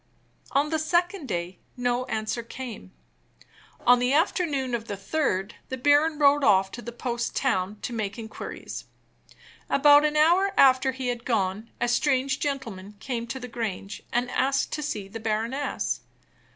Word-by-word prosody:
On 290 +2 +2
the 315 - +1
second 345 +1 0
day 175 -2 -4 0.2
no 245 0 0
answer 220 0 -2
came. 230 - -8 0.9
On 245 0 +7
the 250 +2 +1
afternoon 295 -5 +1
of 230 -1 -2
the 200 - -4
third, 200 -3 -1 0.2
the 260 - -3
baron 290 +4 +3
rode 290 0 +4
off 195 -4 +4
to 240 - -7
the 235 - -7
post 240 0 -3
town 205 -6 0
to 245 - -3
make 205 -3 -3
inquiries. 220 -1 -7 0.8
About 290 +1 +6
an 300 0 +1
hour 365 +6 +4
after 265 0 +5
he 260 -1 -3
had 240 -1 -3
gone, 215 -2 -1
a - - +1
strange 270 +2 +1
gentleman 225 -9 -4
came 235 0 -4
to 235 +3 -5
the 250 - -7
Grange 220 -4 -5
and 245 +1 0
asked 270 +1 +1
to 305 - -3
see 215 -9 -3
the 225 +3 -7
baroness. 225 +6 -1
245 Hz, 160 wpm, -26 LUFS, 220-285 Hz, 0.9 s, On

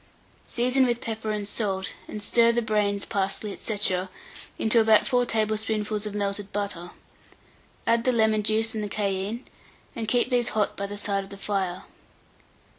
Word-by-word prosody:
Season 255 +2 +2
with 240 -1 0
pepper 220 -1 -4
and 210 -1 -2
salt, 195 -3 -2
and 210 - -4
stir 235 +2 +4
the 240 0 0
brains, 205 -2 0
parsley, 200 +1 -2
&c., 215 - -3 0.8
into 225 +1 +5
about 220 -1 +5
4 245 -2 +2
tablespoonfuls 215 -1 0
of 205 - -6
melted 200 0 -2
butter; 200 -4 -3 1.0
add 230 0 +2
the 255 - +3
lemon 220 -2 +2
juice 220 +2 +3
and 210 -2 -3
cayenne, 200 +3 -2 0.5
and 225 -2 -4
keep 245 +2 +2
these 245 -1 +3
hot 210 - +1
by 200 - -3
the 205 +1 -6
side 200 -1 -1
of 195 - -13
the 200 - -9
fire. 190 -3 -2
215 Hz, 160 wpm, -26 LUFS, 200-230 Hz, 1.0 s, into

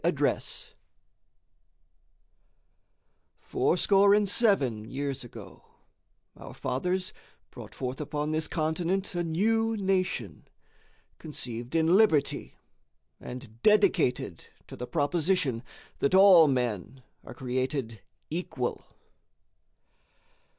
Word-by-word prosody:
November - - +1
19, - - -10
1863_ - - -4 2.7
Fourscore 200 0 +3
and 210 -1 +2
seven 145 - +2
years 140 -1 -4
ago 120 - -12 0.7
our - - -11
fathers 180 +9 -2 0.4
brought - - -11
forth 130 +2 -4
upon 150 +1 -3
this 155 0 0
continent 175 +5 -1
a 175 -1 -1
new 225 +7 +1
nation, 185 - -2 0.7
conceived 125 -3 -6
in 160 -1 +3
liberty, 160 -10 +2 0.6
and 120 -2 -10
dedicated 185 - +2 0.2
to - - -10
the 125 - -6
proposition 155 -5 0 0.4
that 140 - +2
all 190 -4 +8
men 125 -2 -2 0.2
are 125 - -11
created 130 -3 -3 0.3
equal. 145 -7 -4
155 Hz, 95 wpm, -28 LUFS, 125-190 Hz, 2.7 s, all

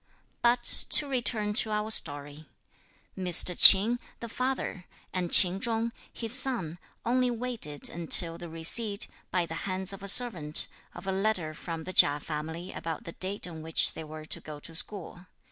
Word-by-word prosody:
But 240 0 0 0.3
to 295 - +7
return 235 -5 -2
to 220 - -7
our 210 +1 -4
story. 145 -3 +1 0.7
Mr. 180 -1 +2
Ch'in, 215 +8 +8 0.2
the 235 - -8
father, 255 -6 -5 0.3
and 180 -2 -4
Ch'in 185 +2 +6
Chung, 230 0 -3 0.2
his 230 -1 -4
son, 240 - -1 0.3
only 250 +1 -1
waited 235 -11 -5
until 165 0 +2
the 175 - -10
receipt, 200 +6 -1 0.2
by 180 -2 -2
the 165 - -10 0.2
hands 190 +1 -4
of 195 - -11
a 200 - -9
servant, 185 -9 +4 0.3
of - - -11
a 195 - -3
letter 190 -5 -3
from 165 0 -9
the 185 - -8
Chia 145 -3 +4
family 160 +4 -8
about 165 -2 -8
the 170 - -10
date 190 +4 -6
on 165 -3 -11
which 160 0 +2
they - - -9
were 155 0 -11
to - - -2
go 150 -1 -11
to 165 - -11
school. 180 0 -4
185 Hz, 170 wpm, -26 LUFS, 160-225 Hz, 0.7 s, Ch'in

